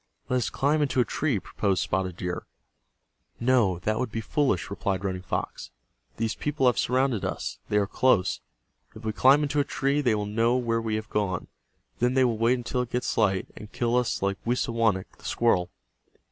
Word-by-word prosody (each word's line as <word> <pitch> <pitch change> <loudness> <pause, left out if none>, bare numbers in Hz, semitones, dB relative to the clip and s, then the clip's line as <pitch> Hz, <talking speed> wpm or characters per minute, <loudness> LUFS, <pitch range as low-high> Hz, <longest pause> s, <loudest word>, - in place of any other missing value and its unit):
"Let 125 - +2
us 120 - 0
climb 150 +3 +1
into 135 -3 +1
a 125 - +4
tree," 145 -7 0
proposed 95 0 -1
Spotted 95 -2 -2
Deer. 90 -1 -4 0.9
"No, 120 -7 +3
that 110 0 0
would 125 -3 -2
be 115 - -3
foolish," 120 - 0
replied 100 -1 -2
Running 95 -2 -2
Fox. 95 - -4 0.5
"These 115 0 0
people 150 -2 -1
have 120 -6 +4
surrounded 125 0 +1
us. - - -3
They 105 - +2
are 105 - +3
close. 100 -2 +2 0.5
If 110 +1 -10
we 110 - -1
climb 135 +6 +5
into 145 0 0
a - - +4
tree 140 +1 0
they 120 -6 +2
will 105 -1 -2
know 115 +4 +2
where 115 -2 0
we 110 -1 -1
have 110 0 -5
gone. 95 -4 -1 0.5
Then 125 +2 +2
they 130 -1 +5
will 115 -3 0
wait 120 +3 +3
until 125 +1 -2
it 125 - -4
gets 125 +1 -1
light, 95 -4 +1
and 105 - -10
kill 120 0 0
us 125 -5 0
like 100 0 0
Wisawanik, 115 -5 0
the - - -16
squirrel." 90 -7 +2
115 Hz, 195 wpm, -27 LUFS, 100-125 Hz, 0.9 s, climb